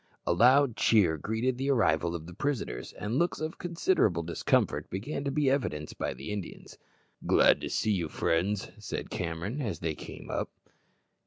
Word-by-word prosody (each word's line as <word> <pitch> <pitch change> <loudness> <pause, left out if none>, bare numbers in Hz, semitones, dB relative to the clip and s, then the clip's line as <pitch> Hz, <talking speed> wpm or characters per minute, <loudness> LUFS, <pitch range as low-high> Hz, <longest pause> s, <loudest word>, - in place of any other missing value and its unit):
A - - +2
loud 125 +5 +5
cheer 95 -8 +4
greeted 115 - -1
the 135 +1 -1
arrival 85 - +2
of 80 -2 -6
the 90 - -10
prisoners, 100 - -3
and 115 +6 -2
looks 175 - +1
of 155 +1 -4
considerable 170 - +1
discomfort 85 +1 0
began 130 +10 -4
to - - +1
be 140 0 +2
evinced 75 - -2
by - - -2
the 105 - -7
Indians. 100 -4 -7 0.5
"Glad - - +5
to - - -4
see 110 - +1
you, 85 -6 0
friends," 95 +6 0
said - - -5
Cameron, 85 - -3
as 105 - -2
they 80 -1 -2
came - - -9
up. - - -2
105 Hz, 170 wpm, -29 LUFS, 85-135 Hz, 0.5 s, loud